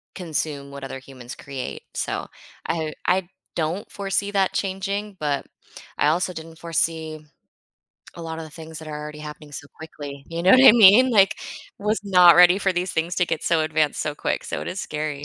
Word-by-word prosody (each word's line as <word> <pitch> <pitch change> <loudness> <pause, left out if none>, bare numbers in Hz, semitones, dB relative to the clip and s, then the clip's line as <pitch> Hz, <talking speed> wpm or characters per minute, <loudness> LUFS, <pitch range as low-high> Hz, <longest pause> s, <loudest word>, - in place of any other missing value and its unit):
consume 155 -5 -4
what 140 0 -9
other 135 0 -6
humans 130 -2 -11
create. 135 -2 -7
So - - -3 0.4
I 160 -2 -1
uh, - - -7 0.2
I 180 0 +1 0.3
don't 165 +4 -3
foresee 200 0 -2
that 195 -2 +1
changing, 195 +1 -3
but 145 -2 -1 0.5
I 145 - +2
also 175 +4 +1
didn't 160 0 -10
foresee 160 -1 -2 1.0
a 170 - -9
lot 160 0 -5
of 165 - -6
the 155 - -12
things 160 0 -9
that 160 - -9
are 150 -1 -5
already 150 0 -8
happening 150 0 -10
so 145 - -8
quickly. 145 -3 -9
You 170 0 -4
know 185 - +5
what 255 - +8
I - - +11
mean? 230 +3 +7
Like, 195 -4 +5 0.5
I 200 - -10
was 215 +1 +1
not 180 -3 +7
ready 180 +1 +7
for 195 -2 +1
these 180 +1 -2
things 165 +2 -1
to 180 - +2
get 165 -2 -2
so 165 -1 +2
advanced 155 -1 0
so 150 - -3
quick. - - -2
So - - -4
it - - -5
is 195 - -4
scary 150 -1 -4
165 Hz, 205 wpm, -23 LUFS, 150-190 Hz, 1.0 s, I